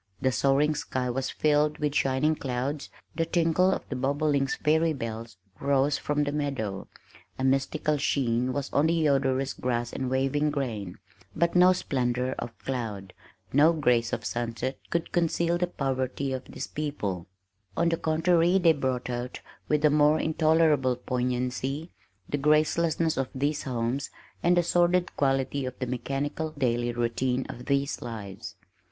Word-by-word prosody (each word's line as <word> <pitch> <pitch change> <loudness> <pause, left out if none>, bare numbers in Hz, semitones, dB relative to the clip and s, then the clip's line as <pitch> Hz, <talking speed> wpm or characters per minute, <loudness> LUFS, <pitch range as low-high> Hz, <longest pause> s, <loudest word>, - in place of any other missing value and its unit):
The 130 - +1
soaring 140 +4 +2
sky 130 -3 -2
was 130 +2 -2
filled 150 0 +2
with 150 -1 -1
shining 145 +2 +2
clouds, 135 +1 -3 0.3
the 165 - +1
tinkle 170 +2 +2
of - - -3
the 135 - -4
bobolink's 140 +1 +1
fairy 160 +1 +2
bells 115 -4 -6 0.2
rose 140 +1 +2
from 150 0 0
the 145 - -1
meadow, 135 -10 -3 0.5
a 130 - -3
mystical 135 +3 +1
sheen 125 -3 +1
was 140 +1 -4
on 150 +3 +3
the 165 -1 +2
odorous 135 -1 +1
grass 120 -1 -2
and 130 -1 -2
waving 135 +3 +1
grain, 115 -10 -3 0.4
but 170 +2 +1
no 180 +1 +7
splendor 125 -7 -1
of 120 -1 -6
cloud, 110 -7 -4 0.4
no 150 +5 +6
grace 125 -7 +2
of - - -3
sunset 120 +2 -3
could 170 -1 -2
conceal 170 0 +1
the 180 - +1
poverty 135 -2 -2
of 130 - -4
these - - -6
people, 105 - -4 0.5
on 170 0 +3
the 165 - 0
contrary 170 +3 +3
they 170 -3 +5
brought 130 -4 -2
out, 125 0 -4 0.3
with 150 0 +2
a 150 - +5
more 150 +1 +4
intolerable 155 -5 +3
poignancy, 125 +5 -2 0.4
the 145 - -2
gracelessness 155 +2 +2
of 135 -1 -1
these 145 +3 0
homes, 125 +1 -2 0.3
and 175 +1 +3
the 175 - +4
sordid 175 +1 +2
quality 135 0 0
of 130 -1 -5
the 130 - -2
mechanical 140 +5 -3
daily 120 -3 +1
routine 120 +2 -1
of 125 - -8
these 140 0 0
lives. 105 -5 -7
140 Hz, 155 wpm, -27 LUFS, 125-155 Hz, 0.5 s, no